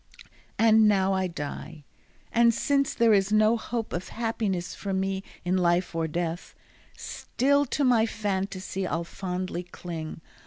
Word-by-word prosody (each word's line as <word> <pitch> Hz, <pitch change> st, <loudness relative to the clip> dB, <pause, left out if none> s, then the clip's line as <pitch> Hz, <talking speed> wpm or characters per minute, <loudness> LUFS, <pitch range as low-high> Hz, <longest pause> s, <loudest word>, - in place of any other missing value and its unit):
And 220 Hz, -1 st, +6 dB
now 195 Hz, -2 st, +3 dB
I 190 Hz, -1 st, +1 dB
die, 155 Hz, -1 st, -7 dB, 0.5 s
and 235 Hz, -1 st, +4 dB
since 275 Hz, -1 st, +1 dB
there 230 Hz, -2 st, +4 dB
is 195 Hz, 0 st, +3 dB
no 215 Hz, +1 st, +5 dB
hope 230 Hz, 0 st, -4 dB
Of 175 Hz, +2 st, -3 dB
happiness 210 Hz, -6 st, -2 dB
for 200 Hz, -1 st, -4 dB
me 190 Hz, 0 st, -1 dB, 0.2 s
in 180 Hz, +1 st, +2 dB
life 175 Hz, 0 st, +2 dB
or 165 Hz, -1 st, -1 dB
death, 170 Hz, +1 st, -4 dB, 0.4 s
Still 285 Hz, +2 st, 0 dB
to 285 Hz, -, 0 dB
my 235 Hz, -4 st, +4 dB
fantasy 195 Hz, -3 st, -3 dB
I'll 170 Hz, 0 st, -1 dB
fondly 180 Hz, 0 st, -4 dB
cling. 170 Hz, -3 st, -7 dB
195 Hz, 145 wpm, -27 LUFS, 175-225 Hz, 0.5 s, And